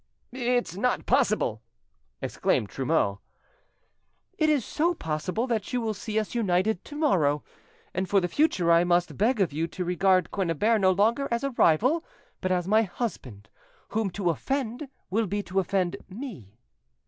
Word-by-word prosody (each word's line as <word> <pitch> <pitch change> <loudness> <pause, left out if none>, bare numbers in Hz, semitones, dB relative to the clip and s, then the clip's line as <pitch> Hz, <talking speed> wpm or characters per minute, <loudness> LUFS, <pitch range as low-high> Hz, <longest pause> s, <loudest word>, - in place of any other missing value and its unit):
"It's 245 -6 -1
not 250 +6 0
possible!" 215 - +1 0.6
exclaimed 100 - 0
Trumeau. 130 -8 0 1.2
"It 310 -1 +2
is 290 -6 +2
so 340 +3 0
possible 180 - -2
that 225 -5 -2
you 250 - +1
will 225 -2 -1
see 215 +1 -4
us 215 -1 -1
united 200 -3 +1
tomorrow. 175 - +1 0.5
And 185 +1 -2
for 200 - +4
the 175 - -1
future 180 - +2
I 170 +1 +6
must 175 0 +1
beg 230 +4 +1
of 180 -7 +1
you 160 +3 -1
to 180 +2 -5
regard 185 0 +2
Quennebert 200 +4 +1
no 190 - +5
longer 225 +9 +2
as 235 +2 -1
a 275 - -1
rival 250 - +3 0.4
but 185 - -1
as 180 -1 0
my 215 +3 +4
husband, 170 - -5 0.4
whom 220 -2 0
to 180 -1 0
offend 265 - -3 0.2
will 220 +2 +1
be 205 +2 -2
to 190 0 -1
offend 185 -1 0
me." 185 - -9
200 Hz, 160 wpm, -27 LUFS, 175-240 Hz, 1.2 s, I